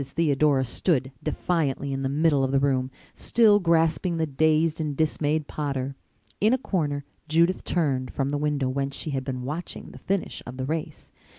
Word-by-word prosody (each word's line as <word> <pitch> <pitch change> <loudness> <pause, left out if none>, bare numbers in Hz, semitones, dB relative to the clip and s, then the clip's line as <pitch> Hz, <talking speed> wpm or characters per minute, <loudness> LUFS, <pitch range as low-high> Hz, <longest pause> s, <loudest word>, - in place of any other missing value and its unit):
Theodora 145 -3 +2
stood 130 +1 0
defiantly 140 -5 -1
in 135 - -2
the 135 - -1
middle 145 -1 +2
of 135 - 0
the 135 - +3
room, 130 -2 +1 0.2
still 215 -3 +4
grasping 165 -1 +2
the 160 - +1
dazed 155 +2 +2
and 150 -3 -3
dismayed 155 -1 0
Potter. 140 -2 -3 0.4
In 215 +4 +4
a - - +4
corner 150 - -2 0.2
Judith 170 +4 +2
turned 140 -7 0
from 135 0 -1
the 145 - -1
window 145 -3 0
whence 135 +1 -2
she 155 - -4
had 135 -1 -2
been 130 -2 -4
watching 150 +7 -5
the - - -12
finish 195 -1 -2
of 125 +1 -7
the 130 - -2
race. 155 +2 -4
145 Hz, 180 wpm, -26 LUFS, 135-165 Hz, 0.4 s, still